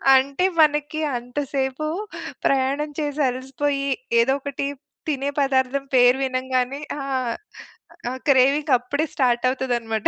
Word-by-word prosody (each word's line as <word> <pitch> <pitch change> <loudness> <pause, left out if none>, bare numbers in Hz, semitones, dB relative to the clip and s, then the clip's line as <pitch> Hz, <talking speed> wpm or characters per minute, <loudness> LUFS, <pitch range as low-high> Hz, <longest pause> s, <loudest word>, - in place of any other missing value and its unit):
అంటే 275 +7 +2 0.2
మనకి 300 0 +2 0.2
అంతసేపు 265 +3 -3 0.6
ప్రయాణం 275 +3 +1
చేసి 295 0 -2
అలసిపోయి, 275 +2 -2 0.3
ఏదోకటి 275 +2 -1 0.4
తినే 280 -2 -1
పదార్థం 270 0 +1
పేరు 245 +1 +6
వినంగానే 255 +1 -1 0.2
ఆ! - - -4 1.1
ఆ - - -3
క్రేవింగ్ 275 +2 +4
అప్పుడే 285 +6 -2
స్టార్ట్ 245 -3 +2
అవుతదన్నమాట 240 -4 -1
270 Hz, 100 wpm, -23 LUFS, 255-285 Hz, 1.1 s, పేరు